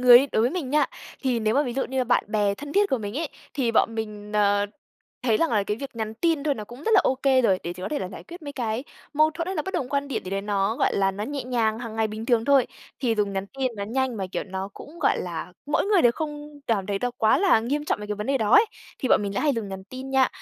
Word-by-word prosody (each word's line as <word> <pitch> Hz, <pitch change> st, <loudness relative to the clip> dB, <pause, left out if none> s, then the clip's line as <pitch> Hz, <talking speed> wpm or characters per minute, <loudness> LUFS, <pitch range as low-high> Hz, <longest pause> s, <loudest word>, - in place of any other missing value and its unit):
người 245 Hz, -1 st, +10 dB
ấy, 275 Hz, +3 st, 0 dB
đối 220 Hz, -, +3 dB
với 240 Hz, -, +3 dB
mình 320 Hz, -7 st, -3 dB
nha, 300 Hz, +1 st, +4 dB, 0.4 s
thì 250 Hz, -4 st, +1 dB
nếu 215 Hz, 0 st, +1 dB
mà 285 Hz, -, +4 dB
ví 250 Hz, -4 st, -3 dB
dụ 270 Hz, -, 0 dB
như 265 Hz, -, -3 dB
là 255 Hz, -, +2 dB
bạn 245 Hz, -, +2 dB
bè 205 Hz, -2 st, +1 dB
thân 285 Hz, +7 st, -8 dB
thiết 405 Hz, 0 st, +3 dB
của 265 Hz, -, +2 dB
mình 210 Hz, +4 st, -4 dB
ấy, 325 Hz, -1 st, -2 dB, 0.3 s
thì 250 Hz, -5 st, +1 dB
bọn 230 Hz, 0 st, +3 dB
mình, 210 Hz, -2 st, -5 dB
ờ, 205 Hz, -1 st, +3 dB, 0.6 s
thấy 225 Hz, -4 st, +3 dB
rằng 330 Hz, -, +2 dB
là 210 Hz, -3 st, +2 dB
cái 210 Hz, +1 st, -1 dB
việc 270 Hz, 0 st, -8 dB
nhắn 220 Hz, -1 st, -3 dB
tin 320 Hz, +4 st, +1 dB
thôi 295 Hz, -2 st, +2 dB
nó 215 Hz, -, -6 dB
cũng 240 Hz, +6 st, -12 dB
rất 450 Hz, -, 0 dB
là 395 Hz, -, +8 dB
okay 265 Hz, 0 st, +3 dB
rồi, 195 Hz, -6 st, +3 dB
để 170 Hz, -, -3 dB
chỉ 180 Hz, +1 st, -10 dB
có -, -, -2 dB
thể 300 Hz, -, -1 dB
là 185 Hz, -, -4 dB
giải -, -, -10 dB
quyết 345 Hz, 0 st, -11 dB
mấy 285 Hz, -1 st, -6 dB
cái 235 Hz, -1 st, -2 dB, 0.3 s
mâu 310 Hz, +1 st, +5 dB
thuẫn 330 Hz, +1 st, -4 dB
hay 380 Hz, +1 st, -3 dB
là -, -, 0 dB
bất 380 Hz, -, -6 dB
đồng 255 Hz, -, -1 dB
quan 280 Hz, +1 st, -1 dB
điểm 275 Hz, -, -2 dB
gì 185 Hz, -, -6 dB
đấy, 195 Hz, 0 st, -1 dB
nó, 205 Hz, +1 st, 0 dB
gọi -, -, +1 dB
là, 195 Hz, -1 st, +3 dB
nó 200 Hz, +2 st, -4 dB
nhẹ 280 Hz, +3 st, -4 dB
nhàng, 230 Hz, -3 st, +1 dB
hàng 230 Hz, -2 st, -6 dB
ngày 220 Hz, 0 st, +2 dB
bình 215 Hz, +1 st, -6 dB
thường 235 Hz, -2 st, +3 dB
thôi. 275 Hz, -2 st, +5 dB, 0.3 s
Thì 240 Hz, -4 st, +2 dB
dùng 205 Hz, -2 st, 0 dB
nhắn 195 Hz, 0 st, -2 dB
tin 260 Hz, -2 st, 0 dB
nó 200 Hz, -, -3 dB
nhanh 255 Hz, +2 st, -1 dB
mà, 195 Hz, -2 st, -2 dB
kiểu, -, -, -1 dB
nó 190 Hz, 0 st, -4 dB
cũng, 320 Hz, +4 st, -11 dB
gọi 310 Hz, -, +2 dB
là, 175 Hz, 0 st, -5 dB
mỗi 295 Hz, -, +1 dB
người 405 Hz, -4 st, +4 dB
đều 240 Hz, -, +6 dB
không 295 Hz, 0 st, -6 dB
cảm 205 Hz, -5 st, +1 dB
thấy 200 Hz, -1 st, -1 dB
nó 245 Hz, -, 0 dB
quá 220 Hz, 0 st, +4 dB
là 375 Hz, -, +5 dB
nghiêm 285 Hz, +6 st, -1 dB
trọng 255 Hz, -, -1 dB
về 210 Hz, -, -6 dB
cái 210 Hz, -, -2 dB
vấn 210 Hz, +1 st, -5 dB
đề 275 Hz, 0 st, +2 dB
đó 215 Hz, -3 st, 0 dB
ấy, 435 Hz, -, +8 dB, 0.3 s
thì 260 Hz, -, -2 dB
bọn -, -, +5 dB
mình 200 Hz, -1 st, -3 dB
lại -, -, 0 dB
hay 300 Hz, -2 st, +3 dB
dùng 225 Hz, -3 st, -3 dB
nhắn 190 Hz, -1 st, -7 dB
tin 260 Hz, +5 st, -8 dB
nha. 265 Hz, -1 st, +4 dB
240 Hz, 310 wpm, -25 LUFS, 210-280 Hz, 0.6 s, người